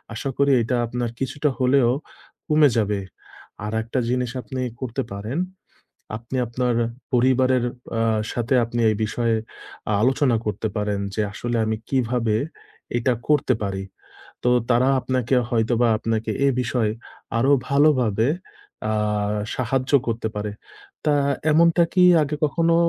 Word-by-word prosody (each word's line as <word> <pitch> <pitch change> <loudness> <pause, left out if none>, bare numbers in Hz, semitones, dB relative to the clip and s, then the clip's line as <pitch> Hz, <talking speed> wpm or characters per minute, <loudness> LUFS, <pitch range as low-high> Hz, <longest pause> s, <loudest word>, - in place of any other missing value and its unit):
আশা 135 +5 -3
করি 140 0 +3
এটা 125 +3 -1
আপনার 120 0 -2
কিছুটা 145 +2 -1
হলেও 130 -1 +4 0.6
কমে 150 -1 +5
যাবে। 105 -2 +1 0.7
আরেকটা 110 +4 -2
জিনিস 125 -1 0
আপনি 130 +3 -5 0.2
করতে 130 +1 -2
পারেন। 105 +9 -4 0.8
আপনি 120 +3 -8
আপনার 125 0 0 0.4
পরিবারের 130 0 +3 0.3
অ্যা 115 -1 +1 0.2
সাথে 120 +2 -1
আপনি 120 +1 -4
এই - - -1
বিষয়ে 115 +1 0 0.6
আ - - +2
আলোচনা 130 0 +3
করতে 105 +1 -2
পারেন 105 -1 -1 0.2
যে, 110 - +1
আসলে 120 +3 -2
আমি 110 0 0
কিভাবে 120 -4 +1 0.6
এটা 125 +1 +2 0.2
করতে 145 -3 +3
পারি। 95 -1 -3 0.6
তো 125 - +3 0.2
তারা 125 +2 +4
আপনাকে 130 0 0 0.2
হয়তোবা 115 +1 +2
আপনাকে 115 -1 -2 0.2
এ - - +5
বিষয়ে 115 -3 0 0.5
আরো 130 +4 +3 0.2
ভালোভাবে 130 -6 +3 0.6
অ্যাঁ 105 -1 0 0.2
সাহায্য 130 +2 -1 0.2
করতে 115 -1 -1
পারে। 105 0 -2 0.5
তা 150 - +3 0.4
এমনটা 170 +2 +5
কি 185 - +5 0.2
আগে 150 +1 -2
কখনো 165 +3 +2
120 Hz, 130 wpm, -23 LUFS, 110-130 Hz, 0.8 s, কমে